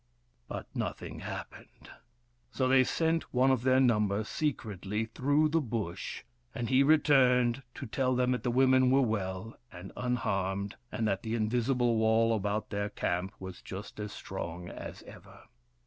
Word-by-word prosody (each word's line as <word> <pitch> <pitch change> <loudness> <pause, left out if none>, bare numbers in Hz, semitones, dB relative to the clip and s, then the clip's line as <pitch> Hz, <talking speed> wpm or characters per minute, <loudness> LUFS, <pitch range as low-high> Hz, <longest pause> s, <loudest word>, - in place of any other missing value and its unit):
But - - -5
nothing - - -4
happened. - - -9 0.6
So 130 - 0
they 130 0 +6
sent 165 +4 0
one 130 +1 +4
of 130 -3 +2
their 130 +1 +4
number 105 -5 +2
secretly 110 - -2
through 145 +7 +1
the 165 +1 +2
Bush, 110 - -4 0.3
and 120 -1 -3
he 130 +1 +5
returned 135 -4 +4
to 140 - -6
tell 130 +2 0
them 125 0 +2
that 125 - 0
the 125 - -1
women 130 +1 +4
were 135 +1 +4
well 110 -1 -3
and 90 +2 -9
unharmed, 100 -5 -1 0.2
and 110 - -1
that 95 -2 0
the 110 0 -2
invisible 120 +1 +1
wall 110 +1 +3
about 105 +1 -2
their 100 0 -1
camp 95 -1 -2
was 95 -1 -8
just 100 +2 -8
as 105 0 -4
strong 90 -3 -6
as - - -8
ever. - - -14
115 Hz, 155 wpm, -30 LUFS, 100-130 Hz, 0.6 s, they